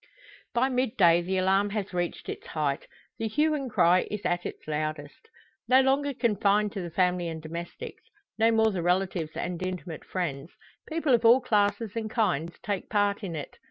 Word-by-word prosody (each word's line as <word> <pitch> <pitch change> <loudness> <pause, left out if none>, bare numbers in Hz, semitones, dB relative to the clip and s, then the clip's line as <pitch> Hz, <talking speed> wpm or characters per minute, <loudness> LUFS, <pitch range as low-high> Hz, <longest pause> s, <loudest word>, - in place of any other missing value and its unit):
By 245 +2 +3
midday 220 -10 +3
the 190 +2 -2
alarm 195 +2 +2
has 205 -2 -4
reached 175 -1 -3
its - - -6
height 145 -3 -2 0.3
the 225 - -1
hue 300 +8 +2
and 275 -4 -3
cry 180 -4 +3
is 210 -1 -5
at 175 0 0
its - - -10
loudest. 155 - -4 0.4
No 260 +1 +6
longer 275 +2 +2
confined 210 -3 +2
to 195 - -5
the 175 - -5
family 180 0 +1
and 160 -1 -5
domestics 170 +2 -7 0.4
no 225 +1 +5
more 220 -1 +3
the 185 -3 -2
relatives 175 -2 0
and 175 -1 -4
intimate 180 -3 -5
friends 160 -5 -4 0.4
people 315 -4 +1
of 235 -1 +3
all 235 +3 +7
classes 210 -1 +1
and 220 -1 -3
kinds 170 - 0
take 205 -5 -3
part 205 0 +1
in 175 -4 -4
it. 150 - -7
195 Hz, 180 wpm, -27 LUFS, 170-225 Hz, 0.4 s, all